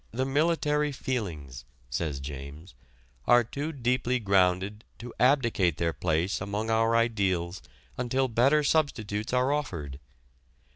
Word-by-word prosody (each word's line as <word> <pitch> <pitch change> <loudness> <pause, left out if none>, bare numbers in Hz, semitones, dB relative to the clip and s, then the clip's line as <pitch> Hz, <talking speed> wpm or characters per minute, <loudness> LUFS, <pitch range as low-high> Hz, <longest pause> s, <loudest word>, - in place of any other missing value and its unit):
"The 130 +3 -2
military 150 +1 +1
feelings," 90 - -4 0.3
says 70 +1 -2
James, 70 +5 -8 0.5
"are 120 0 +6
too 140 +7 -4
deeply 125 -2 0
grounded 100 0 +1
to 120 +1 -9
abdicate 120 - +3
their 85 -1 0
place 85 +3 -1
among 105 +3 -2
our 115 +1 +2
ideals 100 -6 0 0.4
until 130 +2 +1
better 135 +6 +3
substitutes 110 -9 0
are 130 +2 +2
offered 85 - -3
115 Hz, 115 wpm, -28 LUFS, 90-130 Hz, 0.5 s, are